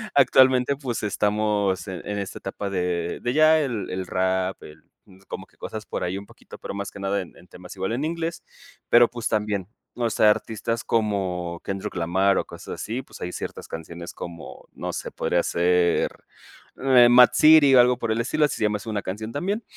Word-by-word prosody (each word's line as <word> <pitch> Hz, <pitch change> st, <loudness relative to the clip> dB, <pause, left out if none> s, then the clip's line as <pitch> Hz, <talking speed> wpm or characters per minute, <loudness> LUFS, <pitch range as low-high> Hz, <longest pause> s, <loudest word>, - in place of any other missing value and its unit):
actualmente, 130 Hz, +1 st, +4 dB
pues 125 Hz, -6 st, -4 dB
estamos 105 Hz, -1 st, 0 dB
en 90 Hz, -, -6 dB
en 105 Hz, 0 st, -3 dB
esta 100 Hz, -, -6 dB
etapa 100 Hz, +1 st, -5 dB
de, 90 Hz, -2 st, -2 dB
de 120 Hz, +1 st, -1 dB
ya 155 Hz, +1 st, +5 dB
el 120 Hz, -10 st, -3 dB
el 95 Hz, 0 st, -4 dB
rap, 95 Hz, 0 st, -1 dB
el 75 Hz, 0 st, -13 dB, 0.2 s
mm, 95 Hz, 0 st, -19 dB
como -, -, -7 dB
que -, -, -31 dB
cosas 110 Hz, -1 st, -7 dB
por -, -, -4 dB
ahí 90 Hz, +2 st, -2 dB
un 100 Hz, -, -9 dB
poquito, -, -, -14 dB
pero -, -, -6 dB
más 100 Hz, -1 st, -5 dB
que 100 Hz, -, -11 dB
nada 100 Hz, +1 st, 0 dB
en 90 Hz, -, -11 dB
en 90 Hz, -, -18 dB
temas 90 Hz, +2 st, -12 dB
igual 95 Hz, +3 st, -2 dB
en 140 Hz, +5 st, -1 dB
inglés, 165 Hz, +1 st, -3 dB, 0.5 s
pero, 120 Hz, 0 st, +6 dB
pues 120 Hz, -2 st, -4 dB
también, 105 Hz, -4 st, -1 dB, 0.3 s
o 120 Hz, -2 st, 0 dB
sea, 105 Hz, 0 st, +4 dB
artistas 115 Hz, +2 st, -3 dB
como 95 Hz, -6 st, -1 dB
Kendrick 95 Hz, -1 st, -5 dB
Lamar 95 Hz, +3 st, +2 dB
o -, -, -3 dB
cosas -, -, -9 dB
así, 120 Hz, +4 st, -4 dB
pues -, -, -14 dB
hay 90 Hz, -, -4 dB
ciertas -, -, -7 dB
canciones 85 Hz, +1 st, -8 dB
como, 85 Hz, -2 st, -9 dB
no -, -, -5 dB
sé, -, -, -5 dB
podría 85 Hz, -, 0 dB
ser 90 Hz, 0 st, +2 dB, 0.7 s
M.A.A.D. 125 Hz, -2 st, +6 dB
City 155 Hz, -3 st, +7 dB
o -, -, +8 dB
algo 125 Hz, 0 st, +3 dB
por 115 Hz, -1 st, -2 dB
el 115 Hz, -, 0 dB
estilo, 150 Hz, +5 st, +1 dB
así -, -, -2 dB
se -, -, -2 dB
llama 105 Hz, 0 st, +1 dB
así 110 Hz, -, -9 dB
una 105 Hz, -2 st, -2 dB
canción 110 Hz, +4 st, -5 dB
también. 200 Hz, -, -2 dB
105 Hz, 205 wpm, -24 LUFS, 95-120 Hz, 0.7 s, o